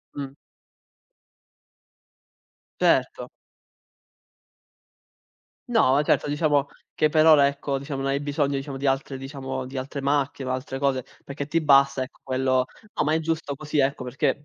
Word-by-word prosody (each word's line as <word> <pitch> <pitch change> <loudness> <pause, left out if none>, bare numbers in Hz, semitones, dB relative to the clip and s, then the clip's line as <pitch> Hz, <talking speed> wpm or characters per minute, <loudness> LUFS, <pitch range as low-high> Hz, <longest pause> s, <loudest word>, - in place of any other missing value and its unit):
Mh. 140 -1 -4 2.5
Certo. - - +2 2.4
No, 145 - +4
certo, 150 - +1
diciamo 145 -2 +1 0.3
che 155 - +3
per 155 0 +4
ora 150 -3 +7
ecco 140 0 -1
diciamo, 135 0 -5
non 135 - 0
hai 140 +1 -1
bisogno 145 -1 -1
diciamo, 135 0 -4
di 140 +1 -2
altre 135 0 -1
diciamo 135 -1 -5
di 130 +1 -7
altre 135 +2 -4
macchie 140 -1 -1
o 130 - -2
altre 130 +1 -4
cose, 135 -3 0 0.2
perché 140 0 -5
ti 165 +3 0
basta 140 -3 +4
ecco 130 - -12
quello 130 0 +1 0.3
no, - - +1
ma 150 - +1
è 160 - +2
giusto 160 -2 -2
così 150 +1 -3
ecco 135 -1 0
perché 135 +3 -1
140 Hz, 145 wpm, -25 LUFS, 135-145 Hz, 2.5 s, ora